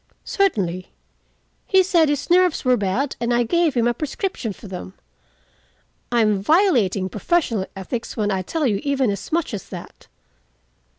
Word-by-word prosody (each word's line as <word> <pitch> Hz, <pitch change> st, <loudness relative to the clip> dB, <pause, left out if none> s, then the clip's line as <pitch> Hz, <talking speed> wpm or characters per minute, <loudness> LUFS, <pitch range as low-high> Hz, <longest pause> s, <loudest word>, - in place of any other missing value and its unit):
"Certainly. 185 Hz, -, 0 dB, 0.8 s
He 380 Hz, -1 st, +5 dB
said 340 Hz, -4 st, +3 dB
his 290 Hz, +3 st, -2 dB
nerves 360 Hz, -4 st, +3 dB
were 255 Hz, 0 st, +5 dB
bad, 225 Hz, +6 st, -1 dB
and 235 Hz, 0 st, -1 dB
I 240 Hz, 0 st, +3 dB
gave 330 Hz, +4 st, +1 dB
him 235 Hz, -1 st, +2 dB
a 240 Hz, -, +2 dB
prescription 295 Hz, -, -3 dB
for 205 Hz, -, -11 dB
them. 180 Hz, -, -8 dB, 1.2 s
I 240 Hz, -1 st, +3 dB
am 210 Hz, -3 st, +2 dB
violating 230 Hz, -, +3 dB
professional 220 Hz, -, 0 dB
ethics 230 Hz, +6 st, -5 dB
when 210 Hz, -1 st, 0 dB
I 190 Hz, -1 st, 0 dB
tell 305 Hz, -, -2 dB
you 205 Hz, -6 st, +1 dB
even 275 Hz, -5 st, +1 dB
as 200 Hz, -, -6 dB
much 330 Hz, -5 st, 0 dB
as 200 Hz, -, -6 dB
that." -, -, -10 dB
240 Hz, 160 wpm, -22 LUFS, 200-320 Hz, 1.2 s, He